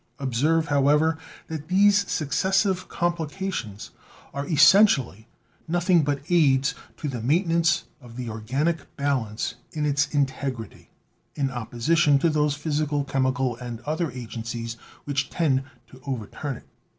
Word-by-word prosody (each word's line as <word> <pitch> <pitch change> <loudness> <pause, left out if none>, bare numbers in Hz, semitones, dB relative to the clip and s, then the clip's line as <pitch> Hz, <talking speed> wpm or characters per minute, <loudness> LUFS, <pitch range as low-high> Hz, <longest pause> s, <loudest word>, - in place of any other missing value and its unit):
"Observe, 150 +5 +1
however, 150 +3 +3 0.3
that 155 -2 -6
these 200 +2 +4
successive 190 - +1
complications 170 - -3 0.4
are 140 0 -4
essentially 140 - +5 0.4
nothing 175 0 +3
but 145 -1 -1
aids 145 -3 +3 0.2
to 155 - -4
the 125 -5 -4
maintenance 170 - +2 0.2
of 120 -2 -13
the 125 -1 -5
organic 135 +10 -2
balance 125 -6 -1 0.2
in 150 -1 -1
its 145 0 +2
integrity, 135 -5 -3 0.5
in 140 -3 -1
opposition 135 +6 +2
to 165 +4 +2
those 150 -1 +1
physical, 150 -1 -1
chemical 130 -2 0
and 120 -2 -7
other 155 +5 -2
agencies 115 -1 -6 0.3
which 140 -2 -2
tend 135 -6 +1 0.2
to 130 +1 -17
over 125 -6 -3
turn 135 +5 -5
it. - - -17
145 Hz, 125 wpm, -25 LUFS, 130-165 Hz, 0.5 s, essentially